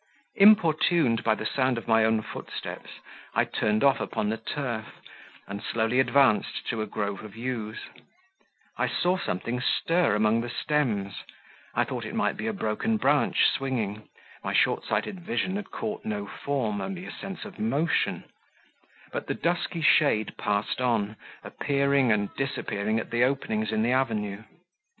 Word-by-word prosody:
Importuned 170 - +5
by 110 - +3
the 110 - -6
sound 130 0 +1
of 115 - -6
my 115 -1 +5
own 110 0 +2
footsteps, - - -7 0.5
I - - +4
turned 105 0 0
off 140 -1 +5
upon 105 - -2
the 110 - -1
turf, 115 -1 -4 0.5
and 100 +1 -6
slowly 115 +3 0
advanced 130 -5 +3
to 115 - -1
a 110 - -2
grove 100 -2 -3
of 110 -1 -10
yews; 115 -3 -4 1.0
I - - +2
saw 180 +1 +1
something 120 - -2
stir 165 - +2
among 110 +2 +3
the 120 - -4
stems; 115 -8 -1 0.6
I - - +3
thought - - -4
it - - -6
might - - +1
be 110 - -4
a - - +1
broken 110 - -1
branch 145 -8 +3
swinging, 110 -6 -1 0.3
my - - -2
short - - +2
sighted 190 - -1
vision 190 0 -2
had 205 -1 -5
caught 215 -1 -4
no 105 -1 -3
form, 110 -4 -2
only 190 -1 -5
a - - -7
sense 195 +1 -7
of 205 -1 -11
motion; 170 -7 0 0.9
but - - -4
the - - -1
dusky 170 -1 -1
shade 145 -9 +4
passed 105 +4 -1
on, 110 -4 +1 0.3
appearing 140 -3 +1
and 105 -2 0
disappearing 110 -5 -1
at - - -6
the 120 +1 +3
openings 110 -5 0
in 110 0 +1
the 120 - +2
avenue. 110 -6 0
120 Hz, 160 wpm, -27 LUFS, 110-145 Hz, 1.0 s, Importuned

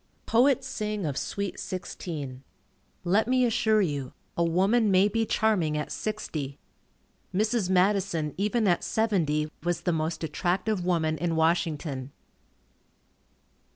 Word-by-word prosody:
Poets 265 +3 +3
sing 210 -6 -3
of 145 -3 -2
sweet 200 +5 -3
sixteen. 150 -7 -5 0.6
Let 200 +6 +2
me 255 0 +3
assure 220 -2 +3
you, 140 -6 -3 0.2
a 170 - +2
woman 195 +7 +3
may 190 +1 +5
be 225 +1 0
charming 180 -9 +1
at 150 - -3
sixty. 155 -10 -4 0.7
Mrs. 215 0 +1
Madison 185 -4 +2
even 210 +3 +1
at 175 -2 +2
seventy 160 -9 0
was 175 -1 -1
the 175 - 0
most 160 +1 -2
attractive 180 +4 -1
woman 160 -3 0
in 170 -1 0
Washington. 160 -4 0
180 Hz, 120 wpm, -27 LUFS, 160-215 Hz, 0.7 s, may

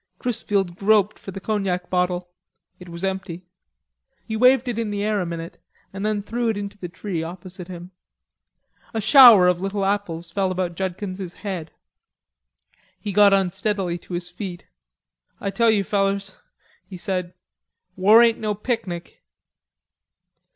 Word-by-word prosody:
Chrisfield 200 -7 -1
groped 210 0 +2
for - - -10
the 195 0 -6
cognac 190 -3 -2
bottle; 180 -1 -1 0.5
it 180 -1 -12
was 170 +1 -8
empty; 190 -2 -3 0.8
he 220 - -4
waved 255 +2 +4
it 235 -2 -2
in 225 -2 -2
the 205 0 -2
air 210 -1 0
a 180 - -3
minute 165 0 -7 0.3
and 195 +1 -5
then 210 -1 -1
threw 235 +3 -1
it 220 - -1
into 200 0 -5
the 180 -3 -7
tree 170 0 -4
opposite 180 +1 -8
him. 180 0 -9 1.0
A - - +1
shower 220 -4 +8
of 180 0 +2
little 195 0 -1
apples 175 -4 -2
fell 190 +1 0
about 180 -1 -2
Judkins's 185 0 -4
head. 180 -6 -4 1.3
He 205 - -4
got 205 +1 +6
unsteadily 195 -1 0
to 175 - -7
his 175 0 -5
feet. 180 -1 -7 0.7
"I 200 - -3
tell 230 +4 +3
you, 210 -3 +3
fellers," 195 -1 -1 0.5
he 185 -1 -9
said, 180 -1 -3 0.6
"war 210 +5 +7
ain't 230 -1 +3
no 210 -1 -1
picnic." 200 -6 -4
195 Hz, 150 wpm, -23 LUFS, 180-210 Hz, 1.3 s, shower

